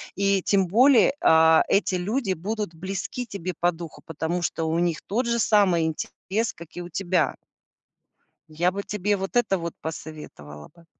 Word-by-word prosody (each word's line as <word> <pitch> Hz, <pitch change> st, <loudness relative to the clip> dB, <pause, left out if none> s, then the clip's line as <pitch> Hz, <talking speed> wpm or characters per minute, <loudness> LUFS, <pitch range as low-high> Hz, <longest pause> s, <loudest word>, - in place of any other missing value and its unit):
и, 195 Hz, -1 st, +2 dB
тем 195 Hz, -2 st, +2 dB
более, 250 Hz, +8 st, +5 dB
а, 160 Hz, 0 st, +6 dB
эти 195 Hz, -1 st, +2 dB
люди 195 Hz, +4 st, -1 dB
будут 205 Hz, 0 st, -4 dB
близки 190 Hz, +8 st, -5 dB
тебе 185 Hz, -5 st, -5 dB
по 175 Hz, +1 st, +3 dB
духу, 165 Hz, -2 st, -10 dB
потому 165 Hz, +2 st, -3 dB
что 170 Hz, -1 st, -2 dB
у 160 Hz, +1 st, 0 dB
них 170 Hz, -2 st, 0 dB
тот 235 Hz, +6 st, 0 dB
же 235 Hz, 0 st, 0 dB
самый 195 Hz, -7 st, +3 dB
интерес, 195 Hz, +7 st, -3 dB
как 170 Hz, -, -12 dB
и 175 Hz, -, -5 dB
у 175 Hz, -, -8 dB
тебя. 175 Hz, -4 st, 0 dB, 1.2 s
Я 175 Hz, +4 st, +1 dB
бы 200 Hz, +2 st, -4 dB
тебе 205 Hz, 0 st, -1 dB
вот 195 Hz, +2 st, -5 dB
это 215 Hz, -6 st, +2 dB
вот 170 Hz, 0 st, -5 dB
посоветовала 150 Hz, -, -9 dB
бы. 170 Hz, -1 st, -20 dB
180 Hz, 170 wpm, -24 LUFS, 165-200 Hz, 1.2 s, а